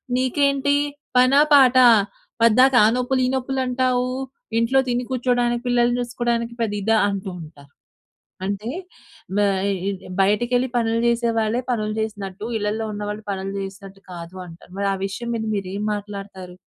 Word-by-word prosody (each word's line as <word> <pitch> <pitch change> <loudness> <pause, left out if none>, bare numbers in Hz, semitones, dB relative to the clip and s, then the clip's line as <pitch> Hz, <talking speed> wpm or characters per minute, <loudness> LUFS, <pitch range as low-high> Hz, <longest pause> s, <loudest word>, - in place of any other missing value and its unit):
నీకేంటి 280 +2 +1 0.4
పనా 255 +3 +5
పాటా? 255 -2 +7 0.5
పద్దాక 250 +4 +5
ఆ - - +6
నొప్పులు, 255 +1 0
ఈ - - +1
నొప్పులంటావూ. 255 -1 0 0.5
ఇంట్లో 230 +4 +3
తిని 245 0 0
కూర్చోడానికి, 245 -1 0
పిల్లల్ని 245 0 +2
చూసుకోడానికి 235 -1 -2
పెద్ద 220 -3 -1
ఇదా?" 225 +3 +2
అంటూ 195 -1 -4
ఉంటారు. 145 -3 -14 0.7
అంటే 200 +3 -3 0.7
బ - - 0 0.3
ఇ 195 0 -2 0.3
బయటకెళ్ళి 240 +6 +2
పనులు 230 -1 +1
జేసే 235 0 +2
వాళ్ళే 220 +3 0
పనులు 215 -2 -1
జేసినట్టు, 205 -2 -5
ఇళ్ళల్లో 215 +1 -2
ఉన్నవాళ్ళు 210 +1 -5
పనులు 195 0 -4
జేసినట్టు 195 0 -8
కాదు 170 +1 -9
అంటారు. 170 +1 -14
మరి 200 - 0
ఆ - - -1
విషయం 235 +5 -6
మీద 225 - -3
మీరేం 200 +1 -4
మాట్లాడతారు? 195 -3 -8
230 Hz, 135 wpm, -22 LUFS, 200-250 Hz, 0.7 s, పాటా